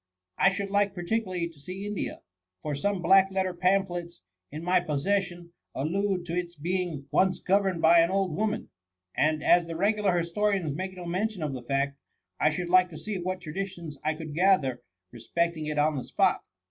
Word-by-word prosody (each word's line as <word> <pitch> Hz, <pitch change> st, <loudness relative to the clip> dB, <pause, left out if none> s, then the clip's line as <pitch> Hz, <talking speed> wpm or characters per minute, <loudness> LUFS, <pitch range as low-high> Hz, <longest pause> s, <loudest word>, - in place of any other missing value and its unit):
— 90 Hz, 0 st, -57 dB
I 195 Hz, -, +5 dB
should 195 Hz, +1 st, -4 dB
like 200 Hz, -1 st, +2 dB
particularly 180 Hz, -1 st, -1 dB
to 165 Hz, -3 st, -16 dB
see 185 Hz, +6 st, -7 dB
India, 205 Hz, -2 st, -4 dB, 0.4 s
for 150 Hz, -, -2 dB
some 185 Hz, +6 st, -1 dB
black 190 Hz, +3 st, +6 dB
letter 190 Hz, -1 st, -1 dB
pamphlets 175 Hz, -2 st, 0 dB, 0.3 s
in 155 Hz, +3 st, -6 dB
my 180 Hz, +1 st, +3 dB
possession, 175 Hz, +2 st, -2 dB, 0.2 s
allude 180 Hz, +5 st, -1 dB
to 170 Hz, -, -5 dB
its 175 Hz, 0 st, -3 dB
being 170 Hz, -2 st, -2 dB
once 190 Hz, 0 st, +3 dB
governed 190 Hz, -3 st, +1 dB
by 170 Hz, +1 st, +7 dB
an 165 Hz, 0 st, +4 dB
old 190 Hz, -4 st, 0 dB
woman; 215 Hz, +2 st, -2 dB, 0.4 s
and 155 Hz, +1 st, +1 dB
as 175 Hz, -1 st, +4 dB
the 165 Hz, -, -5 dB
regular 200 Hz, 0 st, +2 dB
historians 170 Hz, -2 st, 0 dB
make 185 Hz, +2 st, -5 dB
no 180 Hz, -, -7 dB
mention 185 Hz, +1 st, -2 dB
of 150 Hz, -3 st, -2 dB
the 130 Hz, -, -5 dB
fact, 140 Hz, +2 st, -1 dB, 0.4 s
I 155 Hz, -, +4 dB
should 175 Hz, +3 st, -3 dB
like 180 Hz, 0 st, +5 dB
to 160 Hz, -, -9 dB
see 200 Hz, +4 st, -4 dB
what 185 Hz, +1 st, -3 dB
traditions 170 Hz, -3 st, -6 dB
I 155 Hz, +1 st, 0 dB
could 155 Hz, -1 st, -7 dB
gather 155 Hz, -8 st, +2 dB, 0.3 s
respecting 155 Hz, +7 st, -2 dB
it 150 Hz, -1 st, -3 dB
on 150 Hz, +1 st, +2 dB
the 130 Hz, -, -3 dB
spot. -, -, +2 dB
175 Hz, 185 wpm, -28 LUFS, 155-190 Hz, 0.4 s, by